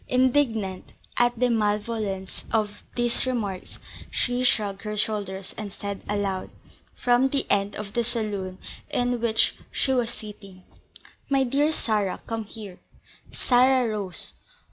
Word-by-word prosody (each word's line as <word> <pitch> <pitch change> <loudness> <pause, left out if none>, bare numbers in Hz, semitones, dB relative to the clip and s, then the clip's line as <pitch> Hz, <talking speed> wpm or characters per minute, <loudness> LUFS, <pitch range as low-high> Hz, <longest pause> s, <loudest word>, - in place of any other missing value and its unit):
Indignant 245 -7 +2 0.2
at 240 0 +3
the 245 +1 +3
malevolence 210 -3 -1
of 210 -2 0
these 240 +1 +1
remarks, 205 -7 -2 0.3
she 245 0 +1
shrugged 205 -5 +2
her 210 -1 -4
shoulders, 200 -3 -2
and 210 -2 -4
said 200 0 -5
aloud, 200 -2 -1 0.5
from 245 +2 +4
the 275 0 +2
end 200 0 +2
of 205 -1 -6
the 235 - +2
saloon 210 -5 -2 0.3
in 245 -1 +1
which 225 -2 +3
she 265 - +1
was 245 -3 +2
sitting: 200 -4 -9 0.7
"My 275 -1 +4
dear 280 +4 +3
Sarah, 210 -9 0
come 225 -1 -3
here." 205 -3 -9 0.5
Sarah 255 0 +4
rose. 185 -5 -2
215 Hz, 130 wpm, -26 LUFS, 200-245 Hz, 0.7 s, from